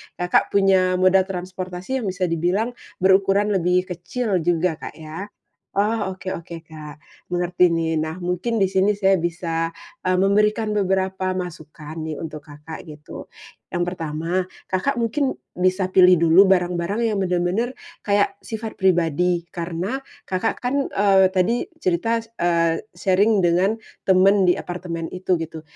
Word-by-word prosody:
Kakak 180 +2 +1
punya 190 -2 +4
moda 185 +1 +4
transportasi 185 +5 -4
yang 215 - -4
bisa 185 0 -3
dibilang 180 +8 0 0.3
berukuran 195 +2 +4
lebih 180 -1 +2
kecil 185 +3 -2
juga, 165 0 0
Kak, - - -8
ya. 160 +5 -7 0.5
Oh, 205 -2 0
oke-oke, 170 -3 -7
Kak, 155 -2 -10 0.3
mengerti 180 0 +2
nih. 165 -1 0
Nah, 160 +2 -4
mungkin 180 +6 -2
di 195 - +4
sini 195 +2 +1
saya 195 -3 +3
bisa, 165 -1 -2 0.3
eee, 185 0 +1
memberikan 210 +3 +2
beberapa 190 -1 0
masukan 155 -3 -7
nih 155 -1 -4
untuk 155 -2 -7
Kakak, 150 +2 -10
gitu. 150 0 -10 0.4
Yang 175 0 -1
pertama, 160 0 -4 0.3
Kakak 240 +9 -1
mungkin 260 +4 0 0.2
bisa 185 +1 +1
pilih 180 -2 +6
dulu 190 +4 +6
barang-barang 180 +4 +1
yang 210 -3 0
bener-bener 180 +7 0 0.2
kayak 200 -1 +2
sifat 220 0 -6
pribadi, 175 -1 +2
karena, 175 +9 -3 0.2
Kakak 185 +4 -1
kan, 275 +3 -1
eee, 195 -2 +4
tadi 190 +6 0
cerita 225 - 0
s 230 - -28
eee, 170 -1 +2 0.2
sharing 200 +2 +3
dengan 185 +6 +2 0.3
teman 190 0 +5
di - - +3
apartemen 175 -2 -5
itu, 185 -1 0
gitu. 160 -1 -6
185 Hz, 140 wpm, -22 LUFS, 170-200 Hz, 0.5 s, pilih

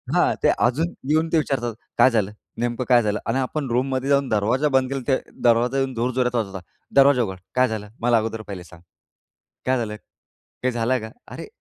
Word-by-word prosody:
हां, - - +3
ते - - +5
अजून 155 +8 +1 0.2
येऊन 160 +2 +3
ते - - +5
विचारतात, 125 -6 -1 0.2
"काय 130 - +7
झालं? 105 -3 +1 0.3
नेमकं 120 +1 -1
काय 120 -1 +6
झालं?" 105 0 0
आणि 115 +3 0
आपण 135 +1 -2
रूममध्ये 130 +2 0
जाऊन 140 -1 +2
दरवाजा 115 +8 +1
बंद 130 0 0
केला 135 - -3
तर 130 - +3 0.3
दरवाजा 120 +3 +3
येऊन 135 -1 0
जोरजोरात 125 +1 0
वाजवतात. 95 -5 -2 0.3
"दरवाजा 135 -3 +6
उघड. 95 -3 -5 0.2
काय 130 0 +4
झालं? 105 -2 -5
मला 120 -1 +4
अगोदर 110 0 -2
पहिले 95 -3 -7
सांग. 85 -1 -16 0.8
काय 130 0 +2
झालं? 110 -3 -3 0.7
काय 130 - +2
झालं 120 +2 0
का?" 110 0 -7 0.2
अरे! - - -7
120 Hz, 190 wpm, -23 LUFS, 110-130 Hz, 0.8 s, काय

